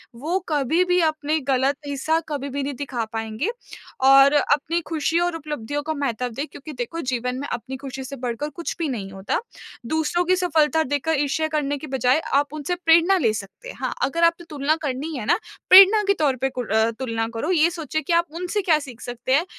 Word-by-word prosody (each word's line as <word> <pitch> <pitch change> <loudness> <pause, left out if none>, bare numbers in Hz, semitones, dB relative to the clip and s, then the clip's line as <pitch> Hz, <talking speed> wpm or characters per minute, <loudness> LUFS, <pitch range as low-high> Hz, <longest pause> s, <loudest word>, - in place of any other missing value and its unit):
वो 320 +10 -1
कभी 305 +4 +2
भी 360 0 +2
अपने 310 -1 0
गलत 265 +2 +2
हिस्सा 315 +3 0
कभी 280 -1 -3
भी 280 +1 -3
नहीं 280 +1 -3
दिखा 250 -4 -3
पाएँगे 225 - -2 0.6
और 275 +1 +7
अपनी 295 +3 +2
खुशी 325 +1 +1
और 350 -1 0
उपलब्धियों 290 -3 -4
का 315 +1 -2
महत्व 250 -4 -2
दें 275 +6 -4
क्योंकि 300 +2 -10
देखो 250 +7 -4
जीवन 250 +1 -2
में 285 - -4
अपनी 265 +3 -5
खुशी 265 0 -7
से 275 +2 -7
बढ़कर 250 +3 -4
कुछ 340 - -4
भी 320 - -1
नहीं 200 -7 -5
होता। 195 - -2 0.4
दूसरों 320 +5 0
की 370 +1 +3
सफलता 320 -3 +2
देखकर 290 +2 -1
ईर्ष्या 315 +2 0
करने 285 -1 -1
की 305 +2 -8
बजाय 260 +2 +2
आप 285 +1 +2
उनसे 305 +4 -2
प्रेरणा 340 +4 +5
ले 230 -10 +2
सकते 215 - -8
हैं। - - -8
हाँ, - - -1
अगर 335 +4 0
आपने 335 0 +2
तुलना 295 +1 0
करनी 285 +3 -3
है 215 - -5
ना, - - +3 0.3
प्रेरणा 390 +3 +9
के 400 - +5
तौर 280 -4 +2
पे 270 - +1
कुर 250 -5 -5
अ, 220 +1 +3
तुलना 225 -3 -2
करो 260 +10 -3
ये 335 -1 +4
सोचें 315 -2 -3
कि 340 - -1
आप 340 0 +3
उनसे 360 +4 -2
क्या 335 -5 +3
सीख 255 -5 -10
सकते 245 +1 -3
हैं 330 +5 +2
290 Hz, 210 wpm, -23 LUFS, 255-325 Hz, 0.6 s, प्रेरणा